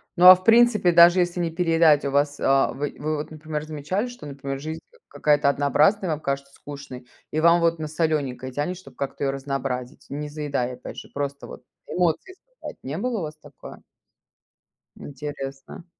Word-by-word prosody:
Ну, 180 - +4
а 185 - +12
в 185 - -12
принципе, 225 -5 +5
даже 170 +2 +7
если 175 0 0
не 170 -1 0
переедать, 165 -3 +3
у 140 - -1
вас, 145 +1 +1
а 135 0 +3
вы 145 +2 -4
вы 155 +1 -2
вот, 150 - -6
например, 155 -1 -5
замечали, 155 - -3
что, 245 -11 -10
например, 135 -1 -6
жизнь 155 +3 -6 0.3
к - - -64
какая-то 145 0 +2
однообразная, 145 +8 +2
вам 150 - -2
кажется 140 -1 -4
скучной 140 -4 -10 0.2
и 155 - -1
вам 170 +1 +5
вот 165 -1 +1
на 155 - -4
солёненькое 150 -5 -2
тянет, 150 +7 -3
чтоб 135 -8 -15
как-то 140 +1 -4
её 135 - +1
разнообразить? 135 -1 -4
Не 150 +1 -5
заедая, 140 -4 -3
опять - - -10
же, - - -9
просто 140 0 -4
вот - - -11 0.2
эмоции, 180 - -1 0.2
сказать, - - -8
не 140 +4 -5
было 235 +2 -2
у - - -4
вас 155 0 -6
такое? 145 -2 -13 1.1
Интересно. 140 +2 -8
150 Hz, 185 wpm, -24 LUFS, 140-170 Hz, 1.1 s, а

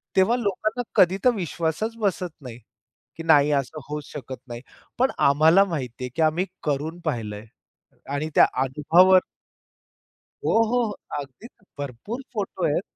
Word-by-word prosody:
तेव्हा 190 +6 +4
लोकांना 215 +1 -1
कधी 185 +1 +5
तर - - +8
विश्वासच 170 +4 -2
बसत 185 -3 -1
नाही, 125 -4 -9 0.6
की 165 - -6
नाही 150 -3 +5
असं 140 +2 -1
होऊच 150 -1 -4
शकत 130 -2 -7
नाही. 120 -1 -7 0.4
पण 260 +2 +2 0.2
आम्हाला 160 +7 +5
माहिती 130 -9 -5
आहे, 125 - -3
की 165 - -1
आम्ही 160 +4 +2 0.2
करून 150 +4 -2
पाहिलंय 110 -7 -3 0.7
आणि 155 +2 -2
त्या - - +8 0.2
अनुभवावर 165 +8 +5 1.3
हो, - - +1
हो, 245 +2 +1
हो, 220 - -2 0.3
अगदीच 140 - -9 0.3
भरपूर 145 - -6
फोटो 195 -5 -3
आहेत. 155 +3 +1
160 Hz, 145 wpm, -24 LUFS, 140-195 Hz, 1.3 s, तर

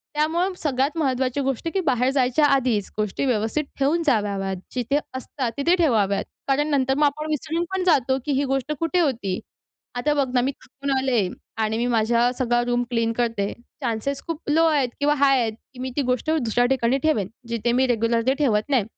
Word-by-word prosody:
त्यामुळं 335 +5 +1
सगळ्यात 280 0 -1
महत्त्वाची 265 -2 0
गोष्ट, 270 +2 -2
की 390 - +1
बाहेर 255 -6 +1
जायच्या 265 +2 +2
आधीच, 255 -8 +2
गोष्टी 210 +5 -1
व्यवस्थित 240 +4 0
ठेवून 305 +5 +2
जाव्यात, 200 -7 0 0.2
जिथे 255 +3 +1 0.2
असतात 260 -1 -4
तिथे 335 +6 +3
ठेवाव्यात. 220 - +2 0.2
कारण 285 +2 +2
नंतर 265 -3 +2
मग 295 - +4
आपण 300 +2 -1
विसरून 310 +3 -1
पण 380 -1 0
जातो, 265 -7 +3
की 295 - -1
ही 275 +1 +1
गोष्ट 270 +2 -2
कुठे 330 +2 +1
होती? 230 - 0 0.6
आता 285 +5 +1
बघ 280 -2 +1
ना, 250 - +3
मी 265 +3 0
थकून 275 +1 -7
आले 250 -7 +1 0.4
आणि 220 0 0
मी 235 - 0
माझा 235 +1 +2
सगळा 240 -1 +2
रूम 245 0 +1
क्लीन 230 -2 0
करते. 225 -4 -1 0.3
चान्सेस 250 +3 -2
खूप 330 -2 -5
लो 320 +2 +4
आहेत 290 -6 +2
किंवा 290 +1 +3
हाय 275 -2 +4
आहेत, 225 -2 -1 0.2
की 250 - -13
मी 260 +1 -3
ती - - +3
गोष्ट 255 +4 0
दुसऱ्या 245 -6 +1
ठिकाणी 255 0 +2
ठेवेन 265 -12 +1 0.2
जिथे 235 0 0
मी 260 +2 +2
रेग्युलर 230 -1 +1
ते 265 - +5
ठेवत 225 -5 +1
नाही. 260 -6 +3
260 Hz, 195 wpm, -23 LUFS, 235-290 Hz, 0.6 s, ते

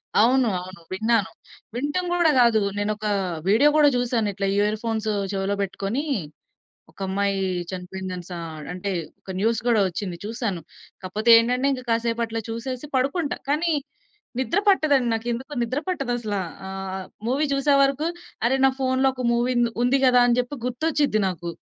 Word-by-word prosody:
అవును. 250 +3 +4
అవును 185 0 -10
విన్నాను. 220 +1 +1 0.5
వినటం 290 +8 -1
గూడా 340 -3 +4
గాదు. 235 -3 +5 0.2
నేనొక 210 +1 -2 0.4
వీడియో 230 +9 +5
గూడా 295 -1 +6
జూసాను. 240 -3 0
ఇట్లా 195 +1 -2
ఇయర్‌ఫోన్స్ 215 +1 0 0.2
చెవిలో 195 +1 -1
బెట్టుకొని 200 +7 -2 0.9
ఒకమ్మాయి 195 +2 -1 0.3
చనిపోయిందనిశ 185 -1 -6
ఆహ్, 160 -2 -8
అంటే 185 +2 -4 0.3
ఒక - - -11
న్యూస్ 225 +2 +1
గూడా 235 -3 +4
ఒచ్చింది, 180 0 -4
చూసాను. 215 -5 -3 0.4
కాపోతే 210 +5 0
ఏంటంటే, 250 +3 +1
ఇంకా 255 -2 -4
కాసేపు 230 0 0
అట్లా 225 0 -3
చూసేసి 250 +4 -5
పడుకుంటా. 280 +4 0
కానీ 325 +3 +1 0.7
నిద్ర 335 +8 0
పట్టదండి. 290 -10 +4
నాకేందుకో 235 +5 -3
నిద్ర 255 +5 -1
పట్టదసల. 245 - -2 0.3
ఆహ్, 190 0 -5 0.2
మూవీ 280 +5 +1
చూసే 275 +1 +3
వరకు, 275 +4 +1 0.4
అరె 265 +3 +2
నా 265 - +5
ఫోన్లో 260 0 +2
ఒక 255 -1 -5
మూవీ 240 +2 +1
ఉంది 235 -1 +2
ఉంది 260 +3 +3
గదా 250 -1 +6
అని 240 -1 +3
జెప్పి 250 +4 -5
గుర్తొచ్చిది 285 -1 +1
నాకు. 175 -2 -5
235 Hz, 145 wpm, -24 LUFS, 200-265 Hz, 0.9 s, గూడా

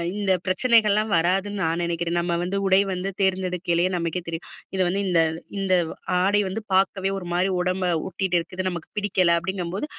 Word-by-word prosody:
இந்த 205 -2 0
பிரச்சனைகள்லாம் 215 +1 +3
வராதுன்னு 195 +4 0
நான் 165 +1 0
நினைக்கிறேன். 170 0 -1
நம்ம 170 0 -1
வந்து 185 +3 -2
உடை 190 0 +5
வந்து 185 +1 -2
தேர்ந்தெடுக்கையிலேயே 185 -2 +1
நமக்கே 170 +1 -2
தெரியும். 165 0 -4 0.3
இத 190 - +1
வந்து, 195 +3 0
இந்த 170 -2 +4 0.4
இந்த 190 -1 +1 0.5
ஆடை 200 +3 +3
வந்து 195 +4 -4
பார்க்கவே 190 0 +2
ஒரு 190 - -6
மாதிரி 180 +2 +2
உடம்ப 185 +1 0 0.2
ஒட்டிகிட்டு 185 -1 0
இருக்குது 185 +2 -5
நமக்கு 170 -3 -6
பிடிக்கல. 185 -4 +2
அப்படிங்கும்போது 185 - -3
185 Hz, 160 wpm, -24 LUFS, 175-195 Hz, 0.5 s, உடை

